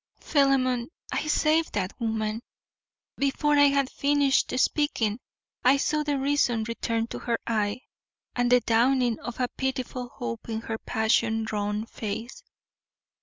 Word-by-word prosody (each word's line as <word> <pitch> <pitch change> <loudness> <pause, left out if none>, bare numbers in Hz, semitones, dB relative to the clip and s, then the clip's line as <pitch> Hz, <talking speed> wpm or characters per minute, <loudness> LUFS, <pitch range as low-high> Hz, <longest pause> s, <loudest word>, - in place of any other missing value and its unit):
Philemon, 260 -4 +2 0.2
I - - -2
saved 310 +1 +2
that 190 -2 -2
woman. 220 -1 -2 0.8
Before 280 +2 +1
I 285 - +8
had 280 -1 +2
finished 285 -1 +2
speaking 250 -6 +1 0.4
I 260 +3 +5
saw 305 +2 0
the 295 -1 -1
reason 270 -5 +1
return 230 0 -2
to - - -5
her 235 -1 -1
eye 215 +1 -1 0.5
and 245 0 +1
the 250 0 +6
dawning 240 +1 +2
of 240 0 -7
a 250 - +1
pitiful 255 -1 -4
hope 115 - -6
in 220 0 -2
her 225 -1 -4
passion 220 0 +1
drawn 210 0 -2
face. 230 - -6
245 Hz, 135 wpm, -26 LUFS, 225-275 Hz, 0.8 s, I